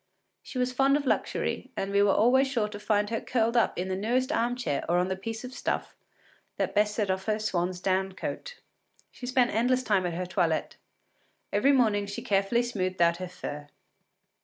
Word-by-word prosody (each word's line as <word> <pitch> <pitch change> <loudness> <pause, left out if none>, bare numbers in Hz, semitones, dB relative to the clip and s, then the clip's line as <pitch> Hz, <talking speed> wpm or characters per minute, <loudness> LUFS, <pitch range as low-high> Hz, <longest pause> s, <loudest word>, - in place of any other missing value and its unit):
She - - -9
was 250 0 0
fond 275 +2 +4
of 290 - -4
luxury, - - -1
and 195 - -2
we 200 0 +3
were 205 -1 +4
always 250 +7 +4
sure 235 -6 0
to 205 -1 -8
find 210 0 0
her 225 - -1
curled 235 -1 0
up 235 - +2
in 180 +2 -2
the 190 - -1
newest 245 +7 0
arm 245 -5 +1
chair 220 - -2
or 175 - +3
on 180 +1 +1
the 190 - -1
piece 220 +4 -6
of 250 +1 -7
stuff - - -3 0.6
that - - -1
best 210 0 +2
set 205 -4 0
off 190 0 -3
her 215 -1 +1
swan’s 180 -4 -1
down 190 +1 0
coat. - - -6 0.5
She 245 - -8
spent 250 -1 +2
endless 250 +3 +2
time 195 -6 +1
at 170 - -4
her 180 +1 -2
toilet; 175 -3 0 0.8
every 210 +8 +4
morning 215 -6 +2
she 200 - -6
carefully 200 +4 +2
smoothed 185 -6 -2
out 170 0 +4
her 185 0 -5
fur. 145 -4 -7
210 Hz, 205 wpm, -28 LUFS, 185-245 Hz, 0.8 s, fond